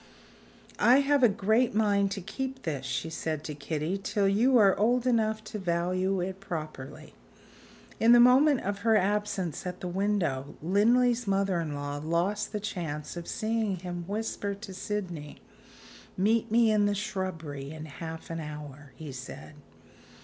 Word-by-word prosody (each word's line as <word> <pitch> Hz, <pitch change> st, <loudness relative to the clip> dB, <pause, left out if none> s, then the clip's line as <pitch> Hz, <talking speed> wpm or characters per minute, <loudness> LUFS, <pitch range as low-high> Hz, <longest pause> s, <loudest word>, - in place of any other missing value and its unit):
"I 255 Hz, +4 st, +6 dB
have 285 Hz, 0 st, +2 dB
a 245 Hz, -, +7 dB
great 220 Hz, +4 st, +1 dB
mind 200 Hz, -2 st, +3 dB
to 195 Hz, -, -5 dB
keep 265 Hz, +7 st, -5 dB
this," 140 Hz, -5 st, -3 dB
she 130 Hz, +5 st, -3 dB
said 155 Hz, -2 st, -3 dB
to 155 Hz, -, -5 dB
Kitty, 155 Hz, +5 st, -3 dB
"till 200 Hz, 0 st, +1 dB
you 235 Hz, +6 st, +4 dB
are 200 Hz, -4 st, +6 dB
old 240 Hz, +4 st, +2 dB
enough 220 Hz, -3 st, +1 dB
to 215 Hz, 0 st, -6 dB
value 185 Hz, +2 st, 0 dB
it 190 Hz, +1 st, -4 dB
properly." 155 Hz, -4 st, -7 dB, 0.9 s
In 230 Hz, +1 st, +5 dB
the 240 Hz, -, +8 dB
moment 260 Hz, +3 st, +6 dB
of 200 Hz, +1 st, -3 dB
her 225 Hz, +1 st, +3 dB
absence 200 Hz, -4 st, -1 dB
at 180 Hz, 0 st, -5 dB
the 180 Hz, -, -5 dB
window, 175 Hz, -8 st, -1 dB
Linley's 230 Hz, +7 st, +3 dB
mother 195 Hz, -2 st, +1 dB
in 155 Hz, -3 st, -4 dB
law 145 Hz, 0 st, -4 dB
lost 180 Hz, +6 st, 0 dB
the 210 Hz, -, -2 dB
chance 170 Hz, -8 st, -5 dB
of 170 Hz, -1 st, -7 dB
seeing 220 Hz, -2 st, -1 dB
him 175 Hz, -1 st, -6 dB
whisper 205 Hz, -1 st, -3 dB
to 200 Hz, -1 st, -9 dB
Sydney. 180 Hz, -6 st, -5 dB, 0.8 s
"Meet 215 Hz, +4 st, +2 dB
me 230 Hz, 0 st, +4 dB
in 210 Hz, -1 st, +3 dB
the 205 Hz, -, 0 dB
shrubbery 175 Hz, -9 st, -4 dB
in 155 Hz, 0 st, -7 dB
half 160 Hz, +2 st, -8 dB
an 165 Hz, -, -3 dB
hour," 145 Hz, -2 st, -8 dB
he 155 Hz, -3 st, -8 dB
said. 130 Hz, +3 st, -9 dB
195 Hz, 160 wpm, -29 LUFS, 160-215 Hz, 0.9 s, the